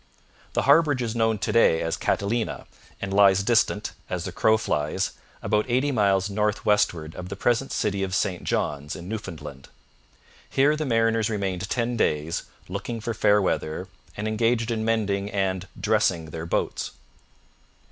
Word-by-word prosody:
The - - +1
harbourage 145 -6 +4
is 115 -1 -3
known 115 -1 +2
to 100 - -2
day 80 -8 +4
as 80 - -1
Catalina, 110 +3 -1 0.3
and 100 0 -4
lies 100 -1 +5
distant, 110 -2 +2 0.2
as 90 -2 -2
the 95 - -4
crow 110 +4 +3
flies, 75 -8 -1 0.3
about 105 +1 +1
eighty 130 +4 +2
miles 100 -5 +2
north 105 +1 -1
westward 85 -7 +1
of 90 0 -7
the 100 - -4
present 120 +6 +1
city 100 -2 -1
of 95 -1 -1
St 95 -3 -1
John's 75 0 -2
in 85 - -8
Newfoundland. 90 -10 -7 0.8
Here 145 +3 +3
the 155 -1 -3
mariners 115 -2 +2
remained 95 -3 -2
ten 120 0 -1
days, 75 -4 0 0.2
'looking 100 +5 -4
for 115 +1 -3
fair 105 -1 +4
weather,' 80 -4 -2 0.3
and 105 +1 -2
engaged 115 +1 +1
in 110 -1 -1
mending 105 -3 0
and 95 -2 -1
'dressing' 95 -7 +1
their 80 +1 -5
boats. - - -2
105 Hz, 155 wpm, -25 LUFS, 95-115 Hz, 0.8 s, lies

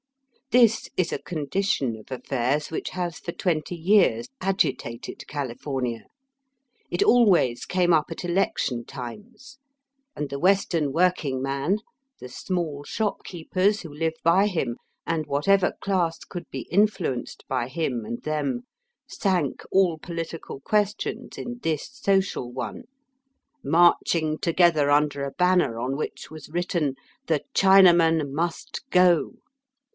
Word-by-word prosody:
This 235 -3 +4
is 180 -2 +1
a - - -2
condition 150 - -1
of 110 +4 -15
affairs 130 +3 -1
which 160 - -3
has 175 -2 -4
for 170 - -5
twenty 170 -1 -1
years 200 +7 +3
agitated 185 - -2
California. 130 -3 -4 0.8
It - - +1
always 190 - +4
came 180 -1 +2
up 155 -2 +3
at 165 - -5
election 170 -9 0
times, 210 - -10 0.6
and 150 - -4
the 140 0 -4
Western 175 -5 +2
working 160 -5 +1
man, 140 +8 0 0.4
the - - -8
small 150 +2 -3
shopkeepers 195 +1 -1
who 165 -4 -9
live 160 +2 -1
by 185 +5 +4
him, 145 - -1 0.3
and 160 -2 -1
whatever 180 +7 +2
class 180 -4 0
could 175 - -8
be - - -6
influenced 190 - 0
by 125 -2 -1
him 130 -7 -2
and 120 +2 -6
them, 155 - -2 0.4
sank 180 - -1
all 180 -4 +3
poUtical 165 -4 -6
questions 210 +3 -1
in 245 0 -6
this 160 -7 -1
social 195 - 0
one, 130 - -6 0.8
marching 165 -2 +3
together 170 -4 +3
under 145 -1 +2
a 140 - -3
banner 180 -8 +2
on 130 +3 -2
which 155 - -5
was 155 -2 -10
written 170 -4 -1 0.2
" - - -37
The 160 -3 +1
Chinaman 170 -6 +5
must 170 - -3
go." 180 -4 +4
165 Hz, 130 wpm, -25 LUFS, 140-190 Hz, 0.8 s, Chinaman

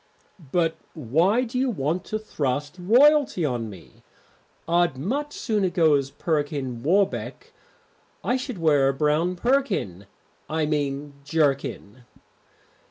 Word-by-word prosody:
"But 165 -2 +1 0.2
why 165 - +2
do 250 +1 -3
you 265 0 +1
want 170 - -2
to 215 - -2
thrust 145 -7 -3
royalty 250 - +4
on 120 -5 -2
me? 95 -4 -14 0.7
I'd 170 -4 +2
much 275 - -2
sooner 210 -9 -1
go 165 -3 +3
as 140 -1 +1
Perkin 145 -5 -2
Warbeck. 190 +8 0 0.7
I 250 - +1
should 255 -3 -4
wear 145 -5 +3
a 135 - -1
brown 155 +5 +1
perkin 190 - -1 0.4
I 160 0 0
mean 145 -1 -2
jerkin." 140 -6 -1
160 Hz, 120 wpm, -24 LUFS, 140-200 Hz, 0.7 s, royalty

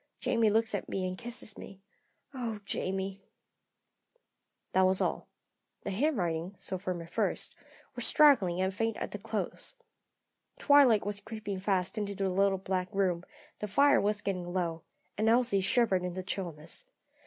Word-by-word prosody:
Jamie 225 -2 +2
looks 220 +1 +1
at 200 - -3
me 185 -1 -1
and 185 - -4
kisses 235 -1 -6
me. 195 - -10 0.5
Oh, 235 -5 -4
Jamie!" 195 0 -3 1.5
That 190 - +3
was 185 0 +2
all. - - -1 0.6
The - - -3
handwriting, 190 - 0
so 190 -2 -4
firm 180 -3 -3
at 165 - -14
first, - - -1 0.4
was - - -4
straggling 255 - +5
and 190 +1 +1
faint 225 +2 -1
at - - -4
the - - -5
close. - - -4 0.8
Twilight 275 -8 +5
was 205 0 -2
creeping 210 -2 -5
fast 190 +1 0
into 200 -1 -3
the 195 0 0
little 195 +1 +2
back 185 -1 -2
room; 185 -3 +1 0.4
the 210 - -3
fire 285 +8 +5
was 205 0 0
getting 180 -3 -2
low, 170 -3 -1 0.4
and 220 +1 +3
Elsie 235 -4 +3
shivered 195 -2 +2
in 180 -1 -3
the 185 - -4
chillness. 175 - -4
195 Hz, 155 wpm, -31 LUFS, 185-220 Hz, 1.5 s, straggling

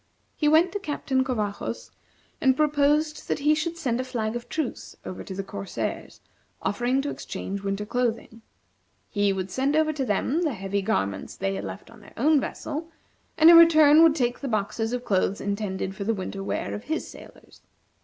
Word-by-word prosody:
He 300 - 0
went 320 +4 +5
to 410 - -3
Captain 285 -6 -1
Covajos 215 -6 -3 0.5
and 265 -2 +3
proposed 300 +1 +1
that - - 0
he 295 +1 +3
should 330 +2 -2
send 255 -7 -1
a - - -3
flag 230 -3 -3
of 240 0 -6
truce 310 -6 -4
over 185 - -6
to 190 - -7
the 195 - -3
corsairs, 195 0 -5 0.4
offering 245 +6 0
to 290 - -2
exchange 195 +1 -5
winter 195 +1 -3
clothing. 230 -1 -2 0.7
He 205 -1 +2
would 190 -1 -3
send 270 +7 0
over 310 0 +2
to 285 -2 -2
them 255 - 0
the 310 -6 0
heavy 195 +1 -2
garments 100 - -2
they 95 - -1
had 95 +1 -4
left 95 - -8
on 230 - -15
their 205 - -16
own 300 +4 +4
vessel, 310 +4 -5 0.5
and 320 +1 +8
in - - +9
return 315 -2 +7
would 325 -2 +6
take 245 -5 0
the 280 - -4
boxes 225 0 -1
of 250 0 -3
clothes 195 0 +1
intended 200 -2 -3
for 200 - -4
the 225 +2 0
winter 195 0 -5
wear - - -3
of 210 - -6
his 320 +1 -2
sailors. - - -15
245 Hz, 190 wpm, -25 LUFS, 200-300 Hz, 0.7 s, in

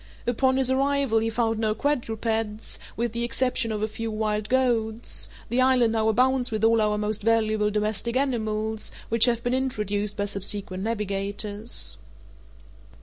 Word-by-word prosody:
Upon 260 +2 +2
his 260 -1 +4
arrival 275 -3 +2
he 225 +1 -1
found 225 -1 0
no 215 -1 0
quadrupeds, 225 -5 -2 0.2
with 235 0 -1
the 235 +1 -2
exception 240 -1 0
of 215 -1 -2
a - - +1
few 225 +1 -5
wild 215 -1 -2
goats; 235 -3 0 0.2
the 250 +2 +2
island 255 -3 +4
now 220 -1 +1
abounds 255 +2 +3
with 220 -1 -3
all 225 0 +4
our 210 0 +1
most 210 0 -1
valuable 215 -1 +2
domestic 215 +3 -1
animals, 220 -5 -1 0.2
which 230 0 +7
have 235 -1 0
been 245 - 0
introduced 210 -6 -1
by 205 - 0
subsequent 200 -1 -2
navigators. 205 +1 0
225 Hz, 150 wpm, -25 LUFS, 210-240 Hz, 0.2 s, which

